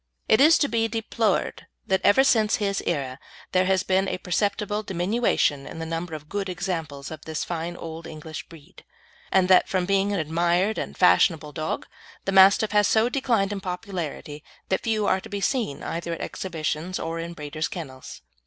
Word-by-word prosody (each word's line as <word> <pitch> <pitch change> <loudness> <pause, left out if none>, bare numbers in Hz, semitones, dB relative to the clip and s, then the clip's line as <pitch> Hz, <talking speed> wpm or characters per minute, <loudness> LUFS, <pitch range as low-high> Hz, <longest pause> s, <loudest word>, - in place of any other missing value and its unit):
It 220 - +5
is 315 +3 +7
to 285 - +2
be 225 -3 +1
deplored 225 -2 -1 0.2
that 190 -1 +1
ever 205 +7 +6
since 220 -5 +3
his 200 -2 -1
era 135 -6 -2 0.3
there 185 0 +2
has 190 -1 +2
been 190 +1 +1
a - - -2
perceptible 205 +3 -1
diminution 185 - 0
in - - -8
the 165 - -4
number 165 0 -4
of 150 -1 -10
good 200 +2 -3
examples 165 -6 -4
of 155 -1 -8
this 160 -1 -3
fine 170 0 -4
old 165 0 -7
English 155 -1 -8
breed, 165 +2 -15 0.5
and 190 -1 +4
that 185 -1 +5
from 185 -2 0
being 195 +1 +2
an 200 - 0
admired 170 +6 +1
and - - -5
fashionable 165 -4 +4
dog 155 0 -3 0.4
the 195 - 0
Mastiff 195 +2 +6
has 210 -1 +4
so 220 +2 +3
declined 235 -7 +1
in 200 -1 -4
popularity 175 -5 -5 0.3
that 190 - +1
few 215 -2 0
are 190 -1 +2
to 220 - -11
be 205 -1 -3
seen 215 - -1
either 170 0 -4
at - - -9
exhibitions 170 0 -3
or 165 0 -4
in 170 +1 -5
breeders' 155 0 -4
kennels. 145 -10 -8
185 Hz, 185 wpm, -25 LUFS, 160-205 Hz, 0.5 s, is